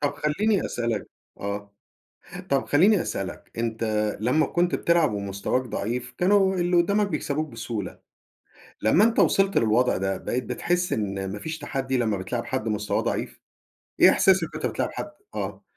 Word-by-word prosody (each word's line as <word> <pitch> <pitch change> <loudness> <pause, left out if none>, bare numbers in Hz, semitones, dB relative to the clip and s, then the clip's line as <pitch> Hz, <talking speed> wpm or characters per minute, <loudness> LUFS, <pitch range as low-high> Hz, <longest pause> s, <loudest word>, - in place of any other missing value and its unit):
طب 145 -1 0
خلًيني 185 +8 +1
أسألك 115 -4 -2 0.3
آه، 100 0 -5 0.8
طيب 135 -1 +2
خلًيني 185 +6 +4
أسألك، 95 -1 -5
أنت 115 0 -2 0.4
لما 130 +7 +2
كنت 175 +3 +1
بتلعب 170 -5 +2
ومستواك 100 +5 -1
ضعيف 120 0 -4
كانوا 190 +1 +3
اللي 175 0 +1
قدامك 200 +4 +3
بيكسبوك 155 -2 -2
بسهولة، 110 -5 -5 0.8
لما 140 - +5
أنت 230 0 +1
وصْلت 195 0 +4
للوضع 115 +3 +2
ده 95 0 -1
بقيت 125 +1 -3
بتحس 175 +10 -1
إن 95 -2 -2
ما 105 - -5
فيش 160 +8 -5
تحدّي 135 -3 -2
لما 110 -4 +1
بتلاعب 110 +6 -3
حد 130 -4 -2
مستواه 105 -1 0
ضعيف؟ - - -3 0.6
إيه - - +8
إحساسك 190 -3 +4
وأنت - - -3
بتلاعب - - -1
حد 305 - -6 0.2
آه. - - -4
130 Hz, 150 wpm, -25 LUFS, 110-175 Hz, 0.8 s, إيه